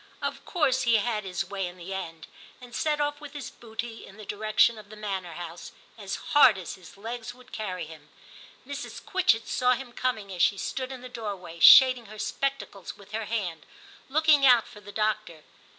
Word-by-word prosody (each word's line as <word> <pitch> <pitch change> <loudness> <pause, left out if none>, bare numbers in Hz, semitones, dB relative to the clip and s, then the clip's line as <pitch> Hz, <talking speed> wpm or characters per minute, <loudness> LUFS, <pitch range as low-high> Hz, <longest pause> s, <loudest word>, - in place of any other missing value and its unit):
Of - - -4
course 285 -7 +1
he 235 -1 +3
had 215 -1 0
his 180 -2 -2
way 195 -2 -3
in 175 +1 -10
the 180 +2 -7
end, 165 -5 -6 0.3
and 245 -2 -13
set 295 +7 0
off 290 0 -1
with 295 -1 -9
his 285 -4 -6
booty 225 0 -7
in 195 - -13
the 215 - -10
direction 215 +2 +2
of 205 -1 -14
the 215 - -10
manor 195 -5 -4
house, 170 +1 -8 0.2
as 200 -3 -5 0.2
hard 255 -8 +7
as 180 -3 -6
his 185 -1 -14
legs 230 +3 -6
would 255 0 -18
carry 185 -5 -4
him. 155 -2 -13 0.6
Mrs. 285 +1 -6
Quitchett 245 -12 +2
saw 250 0 +3
him 250 -1 -6
coming 220 -7 -2
as 175 - -3
she 200 - +4
stood 260 +5 -3
in 260 -2 -7
the 255 - -8
doorway, 200 -8 -6
shading 255 +2 +8
her 215 +1 -11
spectacles 215 -4 -3
with 200 0 -16
her 220 0 -3
hand, 185 -8 -3 0.5
looking 305 0 +4
out 245 -4 +7
for 210 - -13
the 205 0 -11
doctor. 215 -7 -2
215 Hz, 200 wpm, -27 LUFS, 195-255 Hz, 0.6 s, shading